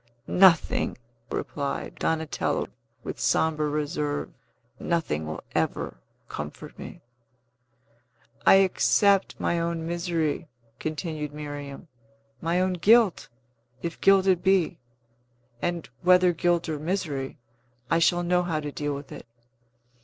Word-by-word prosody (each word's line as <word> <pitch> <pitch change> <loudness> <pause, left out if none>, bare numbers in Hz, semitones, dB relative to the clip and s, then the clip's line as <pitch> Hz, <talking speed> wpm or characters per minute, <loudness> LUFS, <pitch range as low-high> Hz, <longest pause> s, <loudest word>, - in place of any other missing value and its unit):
"Nothing!" 180 -3 +4 0.3
replied 140 -2 -4
Donatello, 160 -1 -1 0.3
with - - -6
sombre 155 -1 +2
reserve. 150 0 -2 0.5
"Nothing 120 - -1
will 80 - -6
ever - - -1 0.3
comfort 75 0 -8
me." - - -9 1.4
"I - - +7
accept 195 +1 +3
my 170 - 0
own 165 -1 -2
misery," 170 -2 -1 0.3
continued 155 -1 -4
Miriam, 145 0 -7 0.5
"my 170 +2 +1
own 185 0 +1
guilt, 210 +2 +4 0.5
if 170 -1 -5
guilt 195 -1 +5
it 185 -2 +3
be; 185 -3 +2 0.8
and, 175 -2 -2
whether 180 0 +5
guilt 175 0 +1
or 155 -2 -3
misery, 155 -5 -3 0.5
I 165 - +4
shall 175 +1 +3
know 180 +1 +2
how 170 -3 -1
to 150 -1 -5
deal 145 0 -3
with 140 0 -9
it. - - -9
165 Hz, 115 wpm, -26 LUFS, 150-180 Hz, 1.4 s, I